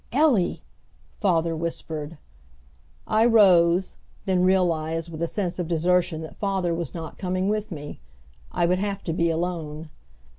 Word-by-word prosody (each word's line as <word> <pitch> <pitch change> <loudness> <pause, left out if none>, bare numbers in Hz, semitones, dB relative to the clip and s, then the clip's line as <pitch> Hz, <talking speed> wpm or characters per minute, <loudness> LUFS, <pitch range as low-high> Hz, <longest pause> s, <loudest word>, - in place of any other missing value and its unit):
"Ellie!" 260 - +2 0.6
father 170 -5 +1
whispered. 160 -1 -5 0.9
I 215 +1 +2
rose, 190 -6 +4 0.3
then 185 -2 +2
realized 165 -3 +1
with 160 0 -7
a 170 - +1
sense 185 -1 -3
of 175 - -2
desertion 175 0 +1
that 160 - -10
father 190 -4 0
was 165 -3 -4
not 165 -2 -7
coming 185 +1 -1
with 215 0 -1
me. 145 -3 -7 0.5
I 175 - +1
would 180 +2 +2
have 200 0 -3
to 165 - -2
be 170 +1 +1
alone. 160 -2 -3
175 Hz, 145 wpm, -25 LUFS, 165-190 Hz, 0.9 s, rose